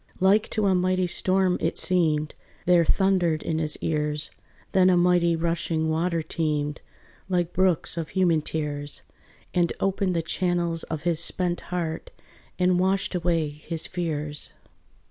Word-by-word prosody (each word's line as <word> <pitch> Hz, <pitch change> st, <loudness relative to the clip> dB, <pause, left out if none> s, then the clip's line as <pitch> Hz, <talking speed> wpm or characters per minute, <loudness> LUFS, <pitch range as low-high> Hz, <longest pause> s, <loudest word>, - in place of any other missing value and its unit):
Like 195 Hz, +3 st, +3 dB
to 215 Hz, -2 st, 0 dB
a 195 Hz, -, +4 dB
mighty 185 Hz, 0 st, +1 dB
storm 185 Hz, +1 st, +1 dB
it -, -, -1 dB
seemed, 155 Hz, -4 st, +1 dB, 0.3 s
There 175 Hz, -1 st, +5 dB
thundered 180 Hz, -4 st, +2 dB
in 160 Hz, -1 st, -1 dB
his 155 Hz, -1 st, -1 dB
ears: 150 Hz, -1 st, -1 dB, 0.4 s
Then 185 Hz, -1 st, +5 dB
a 180 Hz, -, +4 dB
mighty 175 Hz, -1 st, +3 dB
rushing 165 Hz, -1 st, -1 dB
water 165 Hz, +1 st, 0 dB
teemed 150 Hz, -2 st, -2 dB, 0.5 s
Like 175 Hz, -2 st, 0 dB
brooks 185 Hz, -3 st, +2 dB
of 165 Hz, -2 st, -3 dB
human 175 Hz, -4 st, +2 dB
tears, 145 Hz, -2 st, -3 dB, 0.5 s
And 175 Hz, -1 st, +2 dB
opened 195 Hz, -1 st, 0 dB
the 165 Hz, -, 0 dB
channels 170 Hz, -1 st, 0 dB
of 160 Hz, -1 st, -5 dB
his 170 Hz, -2 st, +1 dB
spent 175 Hz, +1 st, 0 dB
heart, 170 Hz, -3 st, -3 dB, 0.5 s
And 180 Hz, -1 st, +3 dB
washed 190 Hz, +2 st, +1 dB
away 170 Hz, -3 st, 0 dB
his 155 Hz, +2 st, -5 dB
fears. 150 Hz, -4 st, -3 dB
170 Hz, 145 wpm, -25 LUFS, 160-180 Hz, 0.5 s, There